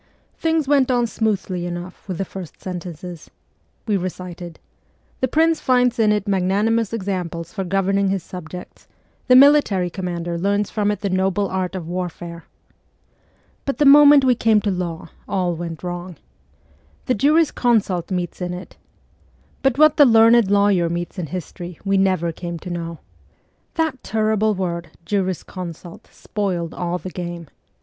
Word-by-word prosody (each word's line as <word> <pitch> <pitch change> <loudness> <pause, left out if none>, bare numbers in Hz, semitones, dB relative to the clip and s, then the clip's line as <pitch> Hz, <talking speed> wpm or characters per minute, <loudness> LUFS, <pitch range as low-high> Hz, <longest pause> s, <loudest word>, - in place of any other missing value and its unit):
Things 320 -3 0
went 275 -2 +3
on 245 -2 +2
smoothly 200 -6 -2
enough 175 +2 -7
with 185 -3 -4
the 195 - -2
first 185 -3 -9
sentences. 175 -2 -7 0.6
We 210 -3 +1
recited: 180 -2 -6 0.3
' - - -39
The 260 - +2
prince 320 +4 +2
finds 250 -2 +2
in 215 -2 +4
it 210 -1 0
magnanimous 200 +4 +1
examples 180 -6 -4
for 195 -3 -3
governing 195 +1 +1
his 190 -3 -1
subjects; 180 0 -10 0.4
the 255 - +6
military 255 -10 +5
commander 175 -2 -4
learns 200 +2 0
from 210 -1 0
it 210 - -2
the 200 - -1
noble 190 +2 +1
art 185 0 -2
of 175 -4 -5
warfare.' 175 -1 -5 1.2
But 275 - -3
the 295 - +3
moment 285 0 +8
we 255 - +5
came 225 -2 +3
to 205 - 0
law 175 -3 -4 0.2
all 185 -3 0
went 165 0 -6
wrong. 175 0 -5 0.4
' - - -34
The 255 - +1
juris 300 +7 +3
consult 205 -8 +1
meets 180 -1 -3
in 180 0 -3
it 180 - -10 0.4
' - - -35
but 270 -2 +1
what 305 0 +5
the 290 - +8
learned 230 -2 +6
lawyer 200 -4 +3
meets 175 +2 -4
in 170 - -3
history 175 0 -7
we 195 0 +2
never 185 -3 +1
came 170 +1 -6
to 175 +2 -8
know 170 -1 -5 0.8
That 320 -6 -1
terrible 215 0 +1
word 170 -3 -3
' 170 - -34
jurisconsult 185 -3 -4
' - - -29
spoiled 180 -5 -3
all 175 0 -2
the 185 +1 -8
game. 175 -3 -6
190 Hz, 160 wpm, -21 LUFS, 175-220 Hz, 1.2 s, moment